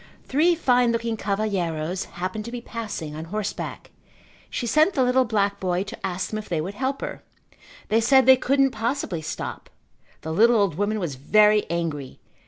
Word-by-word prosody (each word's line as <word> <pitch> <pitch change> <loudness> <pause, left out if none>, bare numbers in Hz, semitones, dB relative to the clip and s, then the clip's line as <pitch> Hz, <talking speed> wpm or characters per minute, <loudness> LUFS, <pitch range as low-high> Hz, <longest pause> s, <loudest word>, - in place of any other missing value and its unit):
Three 325 +6 +3
fine 250 -6 +3
looking 230 -1 -1
cavalheiros 190 -5 -2
happened 185 +4 -5
to 235 - -6
be 245 - -4
passing 215 -10 -6
on 160 +1 -6
horseback. 210 +4 -5 0.6
She 245 - -3
sent 310 - +3
the 265 - +3
little 250 +1 +3
black 200 -3 0
boy 180 0 0
to 205 - -10
ask 185 0 -3
them 215 - -2
if 215 - -10
they 170 - 0
would 180 +6 -4
help 265 +5 -2
her. - - -5 0.7
They 225 +2 +3
said 265 +3 +5
they 260 0 +8
couldn't 270 +1 +2
possibly 225 - -2
stop. 160 +1 -6 0.5
The 160 - -4
little 230 +7 +5
old 200 -5 +2
woman 205 +5 -1
was 170 -7 -3
very 210 +10 +3
angry. 160 -6 -3
215 Hz, 180 wpm, -24 LUFS, 180-245 Hz, 0.7 s, they